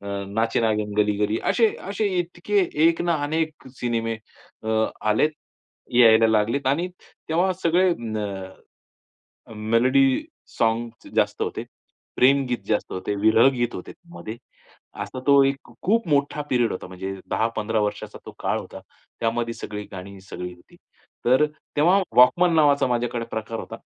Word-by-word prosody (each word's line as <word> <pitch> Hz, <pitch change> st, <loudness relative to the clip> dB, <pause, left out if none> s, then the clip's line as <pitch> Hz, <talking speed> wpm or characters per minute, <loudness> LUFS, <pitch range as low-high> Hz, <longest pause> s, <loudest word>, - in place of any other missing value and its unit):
अ, 100 Hz, -, -11 dB, 0.2 s
नाचे 110 Hz, +3 st, 0 dB
नागीन 105 Hz, -2 st, 0 dB
गली 105 Hz, -1 st, +2 dB
गली. 105 Hz, +1 st, +1 dB
असे, 230 Hz, -2 st, +4 dB, 0.2 s
असे 205 Hz, +1 st, -1 dB
इतके 180 Hz, +4 st, -1 dB, 0.3 s
एक 165 Hz, 0 st, +2 dB
ना, 175 Hz, -1 st, +1 dB
अनेक 155 Hz, -1 st, -2 dB
सिनेमे 115 Hz, -2 st, -1 dB, 0.5 s
अ, 110 Hz, -, -5 dB, 0.4 s
आलेत, 110 Hz, +9 st, +3 dB, 0.6 s
यायला 115 Hz, -2 st, +7 dB
लागलेत 110 Hz, +5 st, +1 dB
आणि 165 Hz, +7 st, +1 dB, 0.4 s
तेव्हा 175 Hz, +4 st, +2 dB
सगळे 175 Hz, +3 st, +3 dB
अ, 110 Hz, -6 st, -4 dB, 1.2 s
अ, -, -, -12 dB
मेलोडी 115 Hz, +5 st, +3 dB, 0.5 s
सोंग्झ 115 Hz, 0 st, -1 dB
जास्त -, -, +1 dB
होते. -, -, -3 dB, 0.5 s
प्रेमगीत 130 Hz, -1 st, +3 dB
जास्त 105 Hz, -, -1 dB
होते. 95 Hz, +2 st, -3 dB
विरह 110 Hz, +4 st, +6 dB
गीत 120 Hz, -1 st, -1 dB
होते 90 Hz, -, -7 dB
त्यामध्ये. 170 Hz, -10 st, -10 dB, 0.7 s
असा 130 Hz, -, -6 dB
तो 140 Hz, -1 st, +7 dB
एक 135 Hz, -1 st, -2 dB
खूप 225 Hz, 0 st, +2 dB
मोठा 145 Hz, 0 st, +1 dB
पिरियड 120 Hz, -3 st, +2 dB
होता. 90 Hz, -, -6 dB
म्हणजे 95 Hz, +1 st, -6 dB, 0.2 s
10-15 110 Hz, -1 st, 0 dB
वर्षाचा 105 Hz, 0 st, -3 dB
तो -, -, -8 dB
काळ -, -, 0 dB
होता. -, -, -10 dB, 0.4 s
त्यामध्ये 115 Hz, 0 st, -1 dB
सगळी 105 Hz, 0 st, -6 dB
गाणी 95 Hz, +1 st, -9 dB
सगळी 90 Hz, -1 st, -7 dB
होती. 90 Hz, -, -21 dB, 0.5 s
तर 130 Hz, +4 st, +5 dB, 0.3 s
तेव्हा 180 Hz, +7 st, +4 dB
वॉकमन 170 Hz, +8 st, +6 dB
नावाचा 145 Hz, -3 st, +4 dB
माझ्याकडे 120 Hz, -1 st, -1 dB
प्रकार 110 Hz, +1 st, -4 dB
होता. -, -, -8 dB
120 Hz, 145 wpm, -24 LUFS, 110-145 Hz, 1.2 s, यायला